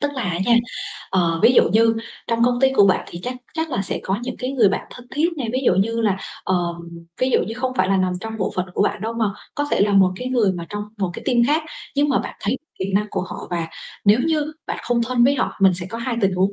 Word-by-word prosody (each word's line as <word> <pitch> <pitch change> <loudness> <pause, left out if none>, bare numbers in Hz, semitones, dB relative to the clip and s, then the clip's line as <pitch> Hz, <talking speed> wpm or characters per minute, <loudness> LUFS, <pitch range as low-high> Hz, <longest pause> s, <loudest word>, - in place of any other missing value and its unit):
Tức 290 - 0
là 260 - -2
á 180 -3 -1
nha, 240 - +5 0.6
ờ, 170 -3 +1
ví 230 +3 +7
dụ - - +7
như 225 +1 +5 0.3
trong 230 0 +2
công 245 0 +2
ty 265 0 +5
của 205 -6 +6
bạn 190 - +2
thì 170 - -7
chắc 250 - -3 0.2
chắc 320 -1 -2
là 195 -7 -1
sẽ - - -2
có 190 +2 -1
những 255 - -4
cái 255 +1 -3
người 235 -7 +5
bạn 195 - -2
thân 250 -1 -12
thiết 310 +4 +1
này, 255 -6 -3
ví 255 - 0
dụ - - +5
như 230 +5 +1
là, 205 -4 +2 0.3
ờm, 175 -2 0 0.4
ví 255 +1 +2
dụ - - +4
như 225 - -4
không 255 +2 -2
phải - - +2
là 195 - +3
nằm 185 -1 +1
trong 225 +1 -5
bộ 190 - -1
phận 185 0 0
của - - +2
bạn - - 0
đâu 225 +1 -2
mà 230 -2 0 0.3
có 290 - -1
thể - - +2
là 205 0 +3
một 190 -2 +5
cái 250 +5 -4
người 230 -7 +2
mà 170 -2 -6
trong 205 0 -4 0.2
một 190 -3 0
cái - - -8
team 250 -3 +2
khác 310 +4 +2 0.3
nhưng 290 +1 +2
mà 275 - +3
bạn - - -5
thấy 225 +6 -1 0.2
kỹ 190 +1 -3
năng 210 +1 +2
của - - -1
họ. 185 - -7
Và 170 -2 -1 0.4
nếu 205 +2 +6
như 305 -1 0
bạn - - -3
không 240 -1 +1
thân 240 0 +2
với 275 +3 +4
họ 275 - -1
mình 190 -2 +5
sẽ 175 0 -3
có 230 - -5
2 235 0 -2
tình 195 -3 +2
huống, 190 +2 +2
225 Hz, 285 wpm, -21 LUFS, 190-255 Hz, 0.6 s, ví